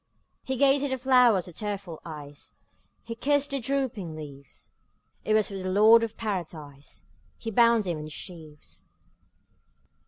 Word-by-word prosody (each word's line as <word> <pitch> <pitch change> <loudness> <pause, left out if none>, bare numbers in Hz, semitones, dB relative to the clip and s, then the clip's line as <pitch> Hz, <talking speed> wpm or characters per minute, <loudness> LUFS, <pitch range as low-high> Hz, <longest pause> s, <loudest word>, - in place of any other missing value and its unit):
'' - - -48
He 265 - 0
gazed 275 +1 +4
at 285 - -1
the 265 - -1
flowers 250 -7 +4
with 180 - -12
tearful 200 -6 -5
eyes, 145 -3 -10 0.5
He 230 - -6
kissed 285 +4 +1
their 275 - -1
drooping 235 - -2
leaves; 140 -3 -12 0.5
It 215 - +1
was 215 -1 +2
for - - -9
the 185 -1 -4
Lord 215 +4 +6
of 225 -1 -4
Paradise 160 -9 -6 0.3
He 225 - -5
bound 230 0 +4
them 175 -5 -3
in 150 - -6
his 155 - -9
sheaves. 155 -5 -10
205 Hz, 160 wpm, -27 LUFS, 160-240 Hz, 0.5 s, Lord